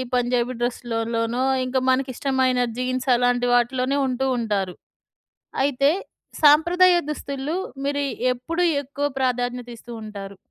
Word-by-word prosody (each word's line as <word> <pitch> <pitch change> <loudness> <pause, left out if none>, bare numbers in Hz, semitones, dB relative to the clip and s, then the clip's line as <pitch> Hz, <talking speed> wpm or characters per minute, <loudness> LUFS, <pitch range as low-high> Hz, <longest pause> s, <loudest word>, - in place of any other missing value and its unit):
పంజాబీ 245 0 0
డ్రెస్లులోనో, 230 0 -1 0.2
ఇంకా 255 +1 0
మనకిష్టమైన 260 0 +1 0.2
జీన్స్ 255 +1 -2
అలాంటి 245 0 +2
వాటిలోనే 255 +3 +1
ఉంటూ 260 +1 -1
ఉంటారు. 200 -5 -1 0.9
అయితే 280 0 +3 0.5
సాంప్రదాయ 345 +5 +6 0.2
దుస్తులు 280 0 -4 0.3
మీరు 285 0 0 0.3
ఎప్పుడు 325 +8 -3 0.2
ఎక్కువ 285 +1 -5 0.2
ప్రాధాన్యత 245 -1 -1
ఇస్తూ 240 +1 -11
ఉంటారు? 200 -2 -8
255 Hz, 105 wpm, -23 LUFS, 240-275 Hz, 0.9 s, సాంప్రదాయ